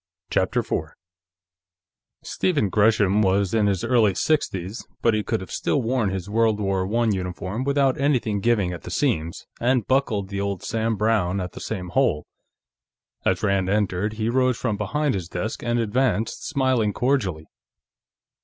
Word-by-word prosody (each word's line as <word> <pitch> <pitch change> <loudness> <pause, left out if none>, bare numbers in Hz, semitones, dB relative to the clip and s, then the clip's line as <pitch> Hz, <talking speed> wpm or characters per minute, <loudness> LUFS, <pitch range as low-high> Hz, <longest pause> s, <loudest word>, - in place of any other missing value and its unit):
CHAPTER - - +1
4 - - -3 1.3
Stephen 145 - 0
Gresham 105 -1 +3
was 100 0 +2
in 110 -2 +3
his 95 -3 0
early 115 -5 +3
sixties, 100 - -1 0.2
but 115 - +4
he 110 - +1
could 110 0 -2
have 95 - -9
still 145 - 0
worn 115 -3 +1
his 95 -1 -4
World 110 0 +2
War 95 -2 0
I 120 0 +3
uniform 95 +4 -3
without 140 -1 +1
anything 125 -7 +1
giving 100 -4 +1
at 85 - -7
the - - -9
seams, 85 - -1
and 125 -1 +2
buckled 115 -8 0
the 100 0 -3
old 100 -2 -3
Sam 115 0 -1
Browne 105 -3 +1
at 90 -1 -4
the - - -10
same 90 -1 -4
hole. 120 - +1 1.0
As 95 +1 +1
Rand 100 -2 +1
entered, 105 0 0
he 110 0 -2
rose 130 0 +2
from 115 -5 -1
behind 135 +8 -1
his 90 -4 -4
desk 105 +6 -4
and 120 0 0
advanced, 115 0 0
smiling 130 -8 +1
cordially. 105 - 0
105 Hz, 160 wpm, -23 LUFS, 95-120 Hz, 1.3 s, but